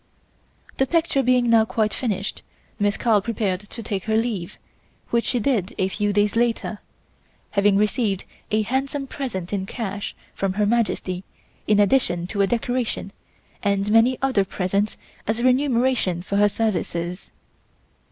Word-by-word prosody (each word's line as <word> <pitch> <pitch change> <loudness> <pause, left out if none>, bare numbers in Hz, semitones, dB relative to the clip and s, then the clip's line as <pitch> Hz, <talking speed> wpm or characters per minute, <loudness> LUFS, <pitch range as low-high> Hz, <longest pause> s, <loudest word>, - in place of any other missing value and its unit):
The 265 - +2
picture 325 -3 +2
being 250 -1 +3
now 230 -1 +6
quite 220 -1 0
finished, 205 -5 -2 0.4
Miss 205 0 +1
Carl 220 -4 +3
prepared 200 -3 -1
to 210 +3 -8
take 200 -3 -3
her 220 0 +2
leave, 220 -7 -2 0.5
which 235 0 +2
she 250 - +1
did 215 -6 0
a 190 - +1
few 205 +1 0
days 205 +1 +2
later, 230 -2 0 0.7
having 200 -1 +3
received 210 -1 +1 0.2
a 215 0 +2
handsome 270 +4 -1
present 215 -10 -5
in 190 -1 -2
cash 205 -3 -4 0.2
from 195 -1 -1
Her 210 +1 +1
Majesty 205 -5 0 0.4
in 210 -1 +4
addition 195 -5 +3
to 200 - +1
a 195 - +4
decoration 240 -2 -1 0.5
and 200 0 +1
many 230 +3 +5
other 260 -7 +3
presents 195 +2 -1 0.3
as 225 +2 0
remuneration 250 -8 +2
for 200 +2 -1
her 205 0 +5
services. 180 -5 -2
210 Hz, 145 wpm, -23 LUFS, 195-240 Hz, 0.7 s, now